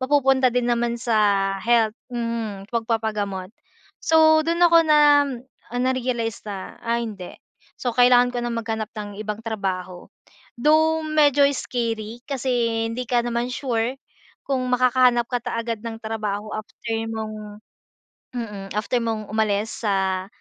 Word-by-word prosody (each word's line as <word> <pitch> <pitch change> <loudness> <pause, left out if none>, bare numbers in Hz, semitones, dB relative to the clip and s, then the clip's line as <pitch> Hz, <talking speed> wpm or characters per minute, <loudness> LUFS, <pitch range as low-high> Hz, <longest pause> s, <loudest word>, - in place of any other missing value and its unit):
mapupunta 265 -1 +3
din 245 -1 +1
naman 235 0 0
sa 235 -2 0 0.4
health, 230 -1 +3 0.2
mm, 230 -5 -4
pagpapagamot. 220 -5 -2 0.5
So 315 -1 +5
doon 340 +1 0
ako 335 -1 +7
na 305 -1 +5 0.8
narealize 245 -3 -1
na, 200 -3 -7
ay 235 0 0
hindi. 190 -4 -9 0.4
So, 245 - -2
kailangan 245 0 +5
ko 245 - -3
nang 240 -1 -3
maghanap 225 -1 -3
ng 205 -1 -6
ibang 215 0 -4
trabaho. 185 -5 -4 0.5
Though, 315 +4 +3
medyo 295 -2 +3
scary 230 -3 -3
kasi 270 -2 -4 0.4
hindi 235 +2 -3
ka 245 0 +1
naman 240 +1 -1
sure 245 0 -1 0.5
kung 265 -2 0
makakahanap 250 -1 +4
ka 245 -2 -1
ta 230 - -3
agad 230 -2 -4
ng 225 -1 -5
trabaho 215 -2 -3
after 215 - -9 0.4
mong 215 -1 -6 0.8
mm, 205 -4 -5
after 215 +4 0
mong 225 -2 -3
umalis 215 0 0
sa, 190 -2 0
230 Hz, 130 wpm, -23 LUFS, 215-250 Hz, 0.8 s, ako